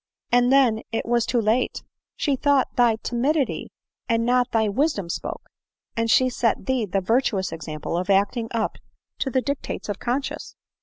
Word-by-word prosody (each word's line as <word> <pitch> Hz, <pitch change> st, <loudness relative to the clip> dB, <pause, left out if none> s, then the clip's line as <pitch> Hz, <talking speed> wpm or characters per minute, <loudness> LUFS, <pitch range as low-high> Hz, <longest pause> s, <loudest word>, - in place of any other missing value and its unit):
And 245 Hz, +1 st, +4 dB
then 250 Hz, -5 st, +4 dB
it 225 Hz, -, -2 dB
was 235 Hz, -1 st, +1 dB
too 245 Hz, -, +1 dB
late; 225 Hz, +3 st, 0 dB, 0.3 s
she 285 Hz, -3 st, 0 dB
thought 280 Hz, 0 st, +2 dB
thy 240 Hz, -2 st, +4 dB
timidity 270 Hz, +4 st, 0 dB, 0.4 s
and 230 Hz, 0 st, +2 dB
not 250 Hz, 0 st, +2 dB
thy 220 Hz, -1 st, +2 dB
wisdom 210 Hz, -, 0 dB
spoke, -, -, -4 dB, 0.5 s
and 230 Hz, 0 st, 0 dB
she 255 Hz, +3 st, +5 dB
set 240 Hz, -2 st, 0 dB
thee 255 Hz, -5 st, 0 dB
the 195 Hz, +1 st, 0 dB
virtuous 205 Hz, -2 st, +1 dB
example 155 Hz, 0 st, -5 dB
of 180 Hz, +3 st, -2 dB
acting 200 Hz, +4 st, +2 dB
up 225 Hz, -2 st, -2 dB, 0.4 s
to 270 Hz, -, 0 dB
the 260 Hz, 0 st, +1 dB
dictates 280 Hz, -5 st, -4 dB
of 205 Hz, -, -3 dB
conscience. 260 Hz, +3 st, -3 dB
235 Hz, 165 wpm, -24 LUFS, 215-260 Hz, 0.5 s, she